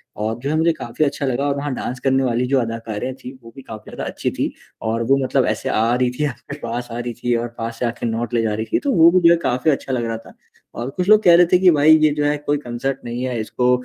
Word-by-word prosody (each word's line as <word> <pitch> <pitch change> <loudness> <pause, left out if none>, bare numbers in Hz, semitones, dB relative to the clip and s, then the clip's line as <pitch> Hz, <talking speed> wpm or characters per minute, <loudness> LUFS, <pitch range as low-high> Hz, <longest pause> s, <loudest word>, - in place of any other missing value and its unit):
और 110 +2 -3
जो 140 +3 -4
है 155 - 0
मुझे 165 +1 +3
काफ़ी 125 +2 -2
अच्छा 140 0 -2
लगा 135 +2 -1
और 140 - 0
वहाँ 140 -1 -3
डांस 125 +1 -5
करने 135 0 +2
वाली 125 0 0
जो 135 0 +2
अदाकारे 115 +1 -4
थी 125 - -7
वो 115 - -12
भी 135 - -10
काफ़ी 110 -4 -10
ज़्यादा - - -6
अच्छी - - -3
थी, - - -3 0.3
और 115 +1 -1
वो 135 +4 +3
मतलब - - +1
ऐसे - - -2
आ 115 +2 +1
रही 125 0 +1
थी 150 - +2
आपके 140 +2 -6
पास 120 +1 -4
आ 120 - -4
रही 120 -1 -4
थी 120 -1 +1
और 120 +1 -1
पास 115 0 -5
से 125 - 0
आके 120 0 -3
नोट 115 +1 -2
ले 115 - +2
जा 110 -2 0
रही 110 +1 -3
थी - - +3
तो 285 - -1
वो 165 +1 +6
भी 185 - +4
जो 170 - +7
है - - +2
काफ़ी 130 +6 +1
अच्छा 135 -1 -3
लग 120 -2 -1
रहा 115 -1 -3
था। 115 - -15 0.4
और 120 +3 -4
कुछ 180 +6 -3
लोग 215 0 +6
कह 170 -1 +7
रहे 175 0 +6
थे 180 - +6
कि 185 -2 +6
भाई 155 +1 +6
ये 155 - +5
जो 145 -1 0
है 145 0 +1
कोई 145 0 -1
कंसर्ट 135 +1 -4
नहीं 120 +2 -4
है 125 -3 -2
इसको 125 +3 0
125 Hz, 295 wpm, -20 LUFS, 115-145 Hz, 0.4 s, जो